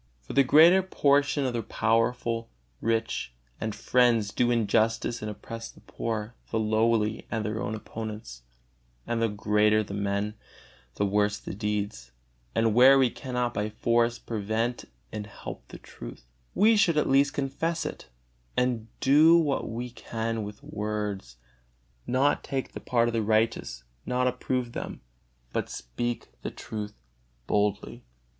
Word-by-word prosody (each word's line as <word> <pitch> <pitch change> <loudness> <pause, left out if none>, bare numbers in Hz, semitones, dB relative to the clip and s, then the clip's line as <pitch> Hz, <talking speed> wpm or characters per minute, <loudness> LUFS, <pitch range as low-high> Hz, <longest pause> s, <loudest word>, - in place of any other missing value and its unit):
For 60 - -9
the 140 - +6
greater 160 +8 +7
portion 145 -5 +2
of 125 - -1
the 120 - -1
powerful, 115 +1 0 0.3
rich 115 - -1 0.2
and 110 -1 -3
friends 115 -5 +2
do 120 - +2
injustice 115 +1 +1
and 105 - -3
oppress 115 +2 -7
the - - -17
poor, 110 0 -4 0.2
the 115 - -1
lowly, 110 0 +1
and 110 -2 -2
their 105 0 -2
own 110 - -2
opponents; 105 - -7 0.6
and 115 -1 -1
the 115 - +2
greater 105 +1 +2
the 100 - -8
men, 100 +1 -1 0.6
the 100 - +1
worse 105 +1 +1
the - - -7
deeds; 100 - -3 0.4
and 115 -1 +3
where 130 +4 +8
we 130 -3 +4
cannot 125 -2 -2
by 105 +1 -1
force 115 +2 +1
prevent 115 +2 -2
it - - -30 0.2
and 105 -1 -5
help 105 - -9
the - - -10
truth, - - -11 0.3
we 220 +3 +5
should 170 -6 +3
at 150 - +3
least 140 +2 +3
confess 145 +5 -1
it, - - -6 0.5
and 125 -3 +1
do 155 +5 +7
what 150 -5 0
we 120 +2 -5
can 115 -1 -3
with 105 0 -8
words, 105 - -4 0.7
not 135 +3 +2
take 135 -1 -3
the - - -7
part 120 -1 +1
of 120 - -1
the 115 - +1
unrighteous, 110 - 0 0.2
not 125 0 +1
approve 125 -1 -1
them, - - -6 0.5
but - - -1
speak 120 - -4
the - - -3
truth 105 -1 -6 0.5
boldly. 105 +3 -1
115 Hz, 150 wpm, -27 LUFS, 105-125 Hz, 0.7 s, where